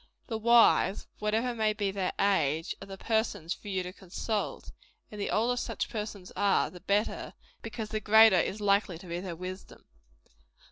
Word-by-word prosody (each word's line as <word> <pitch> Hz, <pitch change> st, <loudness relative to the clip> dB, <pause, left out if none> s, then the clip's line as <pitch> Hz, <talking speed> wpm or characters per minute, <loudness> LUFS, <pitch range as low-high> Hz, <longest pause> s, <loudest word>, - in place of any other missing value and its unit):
The 225 Hz, -, -3 dB
wise, 230 Hz, -3 st, +4 dB
whatever 220 Hz, +4 st, 0 dB
may 220 Hz, -2 st, +1 dB
be 205 Hz, -2 st, -1 dB
their 190 Hz, -2 st, -1 dB
age, 165 Hz, -6 st, +1 dB
are -, -, -9 dB
the 195 Hz, 0 st, -8 dB
persons 210 Hz, -6 st, -1 dB
for -, -, -13 dB
you 190 Hz, -2 st, -1 dB
to 180 Hz, 0 st, -7 dB
consult; 200 Hz, +3 st, -4 dB, 0.4 s
and 210 Hz, -1 st, -7 dB
the -, -, -2 dB
older 235 Hz, +3 st, +1 dB
such 245 Hz, -, -3 dB
persons 210 Hz, -4 st, -6 dB
are, 200 Hz, -1 st, +2 dB
the 180 Hz, -, -11 dB
better 200 Hz, +4 st, -1 dB, 0.3 s
because 225 Hz, -1 st, -6 dB
the 215 Hz, -, -2 dB
greater 215 Hz, -2 st, +6 dB
is 200 Hz, -, -1 dB
likely 200 Hz, -3 st, +2 dB
to 180 Hz, -, -13 dB
be 170 Hz, 0 st, -4 dB
their 180 Hz, -2 st, -5 dB
wisdom. 185 Hz, +2 st, -8 dB
205 Hz, 175 wpm, -29 LUFS, 185-220 Hz, 0.4 s, greater